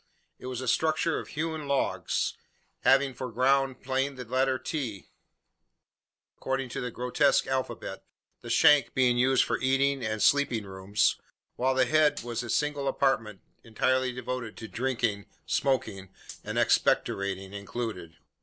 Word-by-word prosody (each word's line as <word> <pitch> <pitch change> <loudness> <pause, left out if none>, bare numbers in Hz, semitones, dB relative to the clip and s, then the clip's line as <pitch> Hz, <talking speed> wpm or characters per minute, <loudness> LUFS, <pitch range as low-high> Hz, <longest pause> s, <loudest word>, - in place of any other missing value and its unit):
It - - -8
was 130 -1 -4
a 130 - -5
structure 160 +5 +1
of - - -8
hewn 155 -1 -4
logs, 140 -1 0 0.4
having 135 0 +3
for 125 0 -6
ground 135 +2 +1
plan 135 +1 -1
the 125 -1 -7
letter 130 +2 +1
T 125 - -5 1.3
according 130 -1 -2
to - - -4
the 125 - -3
grotesque 125 +4 +2
alphabet 130 -1 -4 0.4
the 120 - -9
shank 145 +4 +5
being 125 -2 +3
used 130 +1 +4
for - - -1
eating 135 0 +1
and 110 0 -2
sleeping 140 -6 +3
rooms, 95 +2 0 0.4
while 130 +1 +1
the 130 - +4
head 155 -4 +2
was 120 -1 -3
a 120 - -7
single 145 +3 0
apartment 115 -7 0 0.2
entirely 130 +3 +1
devoted 125 -2 -5
to 110 - -7
drinking 115 -4 -2 0.2
smoking 110 -8 -1 0.3
and - - -4
expectorating 95 0 +1
included. 100 -5 -5
130 Hz, 140 wpm, -28 LUFS, 115-135 Hz, 1.3 s, shank